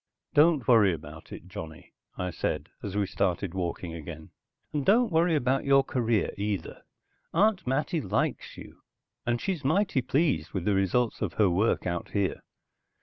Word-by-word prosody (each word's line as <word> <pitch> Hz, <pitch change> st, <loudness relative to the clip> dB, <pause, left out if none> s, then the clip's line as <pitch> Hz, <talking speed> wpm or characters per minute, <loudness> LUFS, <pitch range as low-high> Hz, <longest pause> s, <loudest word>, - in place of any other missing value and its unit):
"Don't 150 Hz, -4 st, +4 dB
worry 110 Hz, -6 st, +6 dB
about 80 Hz, 0 st, -12 dB
it, 90 Hz, -, -9 dB
Johnny," 80 Hz, -3 st, -9 dB, 0.2 s
I 90 Hz, 0 st, -2 dB
said -, -, -3 dB
as 100 Hz, -1 st, -5 dB
we 105 Hz, -, +2 dB
started 90 Hz, -1 st, -1 dB
walking 90 Hz, -2 st, -3 dB
again. 80 Hz, -1 st, -8 dB, 0.4 s
"And 145 Hz, -2 st, 0 dB
don't 225 Hz, -, +4 dB
worry 165 Hz, +1 st, +3 dB
about 135 Hz, -1 st, +1 dB
your 135 Hz, 0 st, +5 dB
career, 115 Hz, -6 st, 0 dB
either. 100 Hz, -1 st, -3 dB, 0.5 s
Aunt 200 Hz, -, +3 dB
Mattie 150 Hz, +5 st, 0 dB
likes 95 Hz, -, -2 dB
you, -, -, -12 dB, 0.5 s
and 120 Hz, 0 st, +1 dB
she's 180 Hz, -3 st, -3 dB
mighty 170 Hz, 0 st, +2 dB
pleased 130 Hz, -, 0 dB
with 95 Hz, -3 st, -3 dB
the 105 Hz, -, +2 dB
results 100 Hz, +5 st, +1 dB
of 100 Hz, -6 st, -2 dB
her 100 Hz, -1 st, +3 dB
work 100 Hz, +6 st, +1 dB
out 85 Hz, -1 st, -3 dB
here. 100 Hz, -3 st, 0 dB
110 Hz, 160 wpm, -28 LUFS, 90-145 Hz, 0.5 s, worry